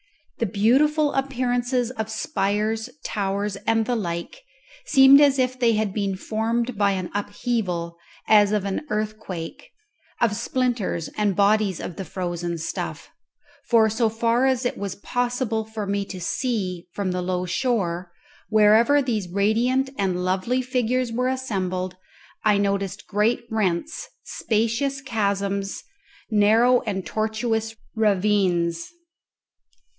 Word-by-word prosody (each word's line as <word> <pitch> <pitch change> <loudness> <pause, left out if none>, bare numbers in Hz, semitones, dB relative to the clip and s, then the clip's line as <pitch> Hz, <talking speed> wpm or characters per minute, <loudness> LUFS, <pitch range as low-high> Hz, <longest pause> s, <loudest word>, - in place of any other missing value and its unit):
The 230 - +1
beautiful 285 +9 +3
appearances 250 -2 0
of 220 -4 -4
spires, 215 +1 -1 0.2
towers, 200 0 -2
and 225 0 +3
the 245 - 0
like 175 - -4 0.5
seemed 270 - +8
as 280 -2 +5
if 255 0 0
they 235 -2 +4
had 215 -2 0
been 200 -2 -1
formed 230 +4 -1
by 200 -1 +2
an 185 -2 -4
upheaval, 205 -5 -2 0.3
as 210 -2 +6
of 210 -2 0
an 195 +5 -2
earthquake, 215 - -4 0.5
of 225 -3 +2
splinters 235 -8 -1
and 205 -3 +1
bodies 200 -1 +2
of 170 - -6
the 195 - -4
frozen 175 -2 -3
stuff; 165 +1 -5 0.6
for, 225 -2 +5
so 225 +1 +1
far 230 +3 +2
as 260 -1 +1
it 245 - 0
was 200 -2 -4
possible 245 0 -1
for 220 -1 -5
me 200 0 -1
to 190 -2 -7
see 185 -3 -2
from 195 0 -2
the 180 0 -2
low 180 0 -1
shore, 180 -5 -1 0.4
wherever 220 +7 +5
these 215 -8 -2
radiant 235 +8 +1
and 180 -2 0
lovely 195 +8 0
figures 250 -1 0
were 250 +2 0
assembled 185 -8 -2 0.5
I 210 -2 +4
noticed 200 -1 -1
great 215 +4 +1
rents, 220 - -1
spacious 230 +5 -1
chasms, 200 -5 -2 0.5
narrow 225 +4 +4
and 190 -3 -2
tortuous 220 0 -1 0.2
ravines. 190 -5 +1
215 Hz, 130 wpm, -24 LUFS, 195-245 Hz, 0.6 s, seemed